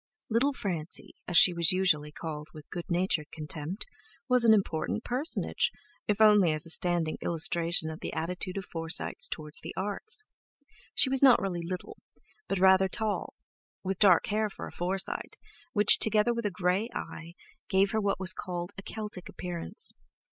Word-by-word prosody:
"Little 260 +6 +2
Francie," 180 - -3
as 175 - +2
she 180 - +8
was 170 -1 +3
usually 170 -6 +1
called 150 -1 -7
with 155 -1 -13
good 175 - -5
natured 170 -3 0
contempt, 155 +4 -5 0.4
was 250 -2 +5
an 230 - +6
important 200 +1 0
personage, 265 +7 0 0.4
if 210 0 0
only 210 -5 +6
as 155 +1 0
a 165 - +2
standing 170 -2 0
illustration 165 0 +1
of 155 - -9
the - - -5
attitude 180 +3 -3
of 195 - -4
Forsytes 165 - -2
towards 150 0 -4
the - - -8
Arts. 315 - +2 0.7
She - - +6
was 270 - +2
not 265 -3 +7
really 180 -3 -3
"little," 180 +2 -6 0.5
but 195 - -1
rather 190 +1 +5
tall, 215 +2 -3 0.5
with 190 -1 -3
dark 190 -5 +5
hair 215 +1 0
for - - -8
a - - -9
Forsyte, 190 +2 -3 0.4
which, 210 -3 +5
together 220 +2 +2
with 235 -2 -2
a - - -1
grey 185 +5 0
eye, 170 +1 -7 0.3
gave 195 0 +3
her 220 - 0
what 200 -2 0
was 190 -1 +2
called 175 -1 -5
"a - - -6
Celtic 210 -3 -6
appearance." 175 - -4
185 Hz, 170 wpm, -29 LUFS, 170-210 Hz, 0.7 s, she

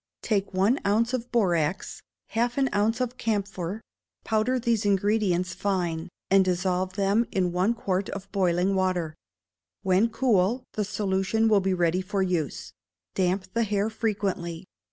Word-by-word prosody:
Take 200 -3 0
one 200 +8 +2
ounce 225 +4 +1
of 250 -1 -3
borax, 180 -6 0 0.3
half 240 +2 0
an 270 -1 +2
ounce 220 +4 +1
of 250 0 -2
camphor; 200 -2 -2 0.4
powder 225 +4 +1
these 230 -3 +1
ingredients 200 -2 +1
fine, 180 -4 -2 0.2
and 195 0 +6
dissolve 185 0 0
them 200 +4 +1
in 180 -2 0
one 185 +6 +1
quart 190 -3 -1
of 200 -1 -6
boiling 185 -1 +1
water; 185 -4 0 0.7
when 190 +4 +3
cool, 230 0 +1
the 210 - -1
solution 195 +2 0
will 210 -3 +4
be 190 0 +1
ready 175 +1 +1
for 195 +1 -1
use; 140 - -2 0.4
damp 185 0 -1
the 230 - +1
hair 210 0 0
frequently. 195 -6 -2
195 Hz, 145 wpm, -26 LUFS, 185-220 Hz, 0.7 s, and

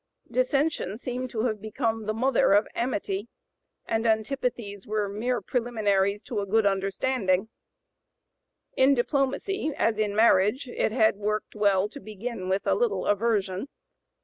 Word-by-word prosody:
Dissension 255 - 0
seemed 255 +1 -4
to 220 -2 -2
have 215 -4 -1
become 220 0 -2
the 215 - 0
mother 250 -3 +3
of 205 +2 +4
amity; 205 -4 -2 0.6
and 225 0 0
antipathies 220 -3 -1
were 210 -1 0
mere 225 +4 -2
preliminaries 205 -3 0
to 225 - -3
a 200 - -2
good 220 +2 +2
understanding; 195 +1 0 1.3
in 270 +1 +5
diplomacy 280 +8 0
as 220 -1 +1
in 210 -1 0
marriage 220 +4 +4
it 240 - -1
had 220 -3 +3
worked 210 +1 -2
well 200 -2 +2
to 260 +7 -10
begin 215 -3 -6
with 190 +1 0
a - - +3
little 470 -1 0
aversion. 205 0 0
220 Hz, 140 wpm, -26 LUFS, 205-250 Hz, 1.3 s, in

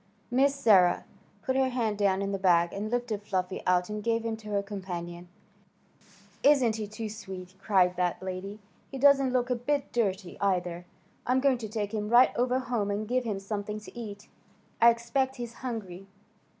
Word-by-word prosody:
Miss 275 +3 +3
Sarah 195 -9 +4 0.4
put 260 - -1
her 265 -1 +3
hand 225 -5 -1
down 200 -1 +2
in 200 - -2
the 195 - -2
bag, 175 -2 +3
and 210 +2 -3
lifted 240 -3 -2
Fluffy 185 -2 -2
out 180 0 +3
and 210 0 -5
gave 230 0 0
him 225 -1 -1
to 215 -1 -11
her 200 -1 0
companion. 175 -3 -6 1.1
"Isn't 260 -6 +4
he 215 -1 -4
too 215 +2 -6
sweet?" 190 -4 -8
cried 185 -3 +2
that 180 -1 0
lady. 190 +2 -5 0.3
"He 270 - -6
doesn't 275 -1 +5
look 250 0 0
a - - +3
bit 280 +4 -2
dirty, 195 -5 -1
either. 180 -3 -1 0.4
I'm 255 +1 +3
going 265 -2 +2
to 220 -2 -6
take 210 -1 -3
him 210 -1 -2
right 240 +2 +6
over 250 +1 +1
home 240 -5 -1
and 205 +1 -2
give 250 +1 0
him 210 -4 -2
something 205 +1 -4
to 215 - -13
eat. 210 -3 -8 0.5
I 235 - +9
expect 235 +3 0
he's 240 -2 -6
hungry." 195 -7 -6
215 Hz, 185 wpm, -28 LUFS, 195-245 Hz, 1.1 s, I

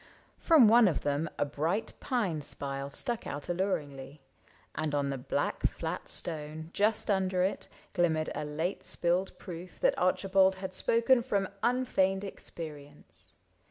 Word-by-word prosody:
From 310 -9 +7
one 230 0 +7
of 170 - 0
them 145 +2 0
A - - +1
bright 160 +9 -1
pine 205 - -1
spile 140 -1 -4
stuck 235 - 0
out 145 +3 -5
alluringly, 150 -6 -2 0.5
And 155 -2 -1
on 140 -1 0
the 135 - -2
black 125 - -1
flat - - -5
stone, 160 0 -4
just 210 +1 +2
under 190 -2 +2
it, 190 - -1 0.3
Glimmered 160 -3 +1
a - - -3
late 160 +6 -3
spilled 175 +2 0
proof 180 0 -9
that - - +4
Archibald 190 -1 +3
Had 190 0 -6
spoken 235 +5 +3
from 200 -6 0
unfeigned 205 -6 +2
experience. 145 - -8
175 Hz, 140 wpm, -30 LUFS, 150-200 Hz, 0.5 s, From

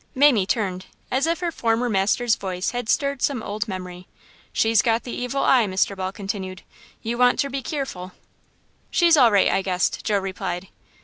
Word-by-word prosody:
"Mamie" 260 -8 +4
turned, 190 -5 -2 0.2
as 270 +5 +1
if 335 +1 -1
her 345 -1 -1
former 230 -3 0
master's 215 +3 +1
voice 185 -2 -3
had 245 -2 -4
stirred 280 -2 0
some 255 -6 0
old 205 0 -3
memory. 180 -2 -7 0.4
"She's 225 -1 +3
got 230 0 +1
the 245 - -7
evil 250 +3 -2
eye," 245 -5 +4
Mr. 190 +1 0
Ball 190 -1 -3
continued. 195 -2 -6 0.4
"You 235 +2 -3
wanter 250 +3 +3
be 275 0 -3
keerful." 255 - -5 0.8
"She's 340 -1 +4
all 250 -6 +6
right, 200 -2 +4
I 195 - +1
guess," 185 -1 0
Joe 210 -2 -1
replied. 190 -1 -4
220 Hz, 175 wpm, -23 LUFS, 190-250 Hz, 0.8 s, all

